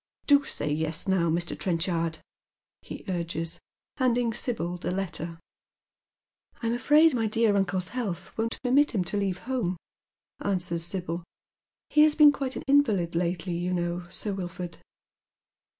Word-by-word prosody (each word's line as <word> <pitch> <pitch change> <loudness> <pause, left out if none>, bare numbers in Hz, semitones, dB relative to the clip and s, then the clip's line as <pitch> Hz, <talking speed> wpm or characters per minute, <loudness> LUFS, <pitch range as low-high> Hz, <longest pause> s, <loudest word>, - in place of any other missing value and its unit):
Do 285 -1 +5
say 150 - -3
yes 160 +2 -2
now, 185 -3 +2
Mr. 170 +2 0
Trenchard," 165 -2 -1 0.6
he - - -9
urges, 165 -2 -3 0.4
handing 245 -3 +2
Sibyl 180 -8 -2
the - - -4
letter. 175 -3 -4 0.6
" - - -37
I'm 230 0 +1
afraid 295 +6 +5
my 225 -3 +1
dear 220 -1 +2
uncle's 190 -2 0
health 200 -8 -4
won't 225 +1 -2
permit 265 +1 +3
him 190 - +2
to 180 +4 -3
leave 195 -2 0
home 235 -9 -1 0.3
" - - -67 0.3
answers 180 -4 0
Sibyl. 175 -1 -3 0.3
" - - -66
He 300 - +5
has 305 0 +5
been 300 -2 +8
quite 270 -2 -4
an - - -5
invalid 220 -12 +3
lately, 175 +1 -1
you 175 +2 -1
know. 175 0 -2
Sir 205 +3 -1
Wilford." 180 -2 -6
185 Hz, 150 wpm, -27 LUFS, 170-235 Hz, 0.6 s, been